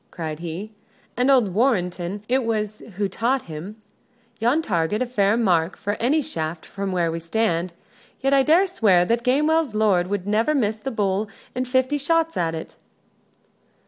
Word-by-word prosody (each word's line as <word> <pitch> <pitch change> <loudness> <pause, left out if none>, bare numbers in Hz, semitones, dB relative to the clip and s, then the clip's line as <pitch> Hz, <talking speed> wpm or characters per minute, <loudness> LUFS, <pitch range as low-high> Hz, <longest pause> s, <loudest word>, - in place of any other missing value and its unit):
cried 155 -3 -5
he. 175 +6 -6 0.4
"And 250 +3 +2
old 245 -9 +4
Warrenton 195 -4 0
it 260 +1 +2
was 215 -2 -2 0.2
who 205 -1 +1
taught 240 +7 0
him. 170 +7 -8 0.6
Yon 250 +8 +2
target 175 - 0
is 255 - -1
a - - -21
fair 205 -2 +2
mark 180 -6 +1
for 205 - -2
any 290 +6 +2
shaft 160 -5 -4
from 200 -1 -4
where 170 -3 0
we 165 - -3
stand. 170 -1 -1 0.5
Yet 270 +1 +1
I 275 - +6
dare 325 +8 +4
swear 200 - +3
that 235 +4 +1
Gamewell's 300 0 +2
lord 200 -5 +2
would 200 -1 -3
never 220 +9 +1
miss 220 -5 0
the 270 - -4
bull 205 -3 -1 0.2
in 255 +1 -2
fifty 260 +3 +1
shots 330 +3 +1
at 165 -1 0
it!" 160 - -8
215 Hz, 175 wpm, -23 LUFS, 180-255 Hz, 0.6 s, I